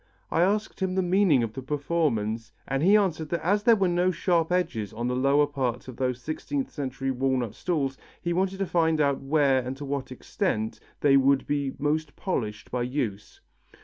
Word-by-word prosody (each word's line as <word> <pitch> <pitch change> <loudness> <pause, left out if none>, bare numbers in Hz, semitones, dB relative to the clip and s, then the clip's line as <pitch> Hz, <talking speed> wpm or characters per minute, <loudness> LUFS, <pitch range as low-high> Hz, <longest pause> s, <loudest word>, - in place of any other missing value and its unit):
I 165 - +2
asked 205 +4 +1
him 190 -1 -1
the 190 - +2
meaning 180 -8 +3
of 110 -2 -3
the 135 - -6
performance 130 -7 -1 0.2
and 135 0 -1
he 195 +6 +6
answered 165 -6 0
that 170 -1 -2
as 205 +3 +3
there 230 +2 +6
were 195 -3 +2
no 175 +1 +2
sharp 170 -1 +1
edges 160 - -1
on 120 +2 -3
the 125 - 0
lower 140 +3 +4
part 130 -4 -3
of 130 - -8
those 125 -1 -1
sixteenth 260 - -3
century 135 -1 -3
walnut 130 -3 0
stools, 140 -7 -2 0.2
he 175 -1 -2
wanted 190 +2 0
to 195 - -1
find 160 -3 +2
out 140 -2 +2
where 135 -1 +3
and 130 +1 -5
to 145 - -6
what 140 -1 -3
extent 125 - -2 0.2
they 140 -1 +5
would 135 0 +3
be 140 -2 -1
most 150 +1 -1
polished 110 - -3
by 125 - -1
use. 120 -6 -3
145 Hz, 195 wpm, -26 LUFS, 130-175 Hz, 0.2 s, he